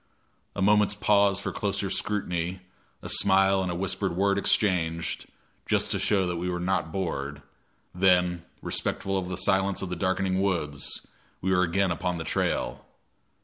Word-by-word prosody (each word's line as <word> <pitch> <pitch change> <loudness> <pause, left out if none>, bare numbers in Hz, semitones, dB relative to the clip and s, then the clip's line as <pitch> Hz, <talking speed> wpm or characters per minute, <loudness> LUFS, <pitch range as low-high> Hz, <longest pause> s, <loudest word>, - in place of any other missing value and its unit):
A 100 - -1
moment's 105 0 +3
pause 100 -2 +3
for - - -4
closer - - -2
scrutiny, 90 -3 -2 0.4
a - - -6
smile 95 0 +5
and 90 -1 -2
a - - -3
whispered 95 0 -1
word 100 +1 +2
exchanged 85 -6 0 0.4
just - - +1
to - - 0
show 100 -3 +2
that 90 -1 -2
we 90 +2 -2
were 90 -1 -2
not 90 -2 -1
bored; 75 -6 -4 0.5
then, 90 -2 +2 0.2
respectful 95 0 -1
of 95 -2 -2
the 90 - -3
silence 95 -1 +2
of 95 - -4
the 90 - -3
darkening 95 0 0
woods, 75 -8 -2 0.3
we 95 - -1
were 90 -1 +3
again 90 +2 +1
upon 90 +1 -2
the 80 - -4
trail. - - -2
95 Hz, 160 wpm, -27 LUFS, 85-95 Hz, 0.5 s, smile